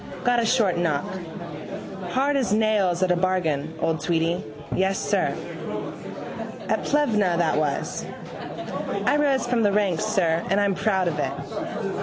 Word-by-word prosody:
Got 245 -1 +4
a - - +1
short 220 -8 +3
knock. 165 -1 +1 1.1
Hard 275 +5 +2
as 260 -6 +1
nails 205 -5 +3
at 185 - +3
a - - +4
bargain, 165 -5 0
old 165 -1 0
Tweedy. 170 0 +1 0.3
Yes, 190 +1 +2
sir. - - +1 1.3
At - - +1
Plevna 215 -12 +3
that 170 -3 +2
was. 150 -2 -1 1.0
I 290 - +4
rose 280 -4 +2
from 240 -1 +2
the 205 - +4
ranks, 200 -5 +2
sir, 170 -3 +2
and 195 +2 +3
I'm 200 -1 +3
proud 190 -4 +2
of 150 -3 -1
it. - - -3
190 Hz, 145 wpm, -25 LUFS, 170-220 Hz, 1.3 s, Got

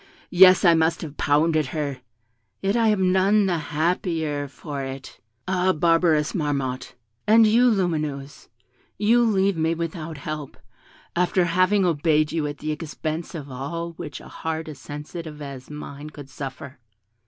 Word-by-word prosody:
Yes, 185 +1 +7
I 170 - +7
must 160 +1 +1
have 150 -2 -7
pounded 155 0 +2
her; 140 -3 -2 0.6
yet 195 +2 0
I 230 -1 +3
am 190 -4 +3
none 195 +2 +3
the 175 -3 0
happier 155 -1 -1
for 140 0 -7
it. 135 0 -8 0.3
Ah, 185 0 +2
barbarous 165 -2 +2
Marmotte! 135 -6 -2 0.3
And 225 +1 +7
you, 235 +4 +5
Lumineuse, 155 -9 -2 0.5
you 220 +5 +4
leave 200 -5 +2
me 160 +1 +1
without 165 -1 -5
help, 150 0 -6 0.6
after 180 +1 +2
having 185 +3 +3
obeyed 155 -2 +2
you 160 -3 -1
at 145 0 -5
the 155 - -3
expense 155 +1 -5
of 145 -4 -7
all 165 +7 -4
which 155 -5 -8
a - - -13
heart 160 0 -4
as 150 -4 -8
sensitive 150 +2 -8
as 140 -3 -8
mine 150 0 -8
could 145 -3 -12
suffer!" 135 -1 -8
160 Hz, 150 wpm, -24 LUFS, 145-180 Hz, 0.6 s, Yes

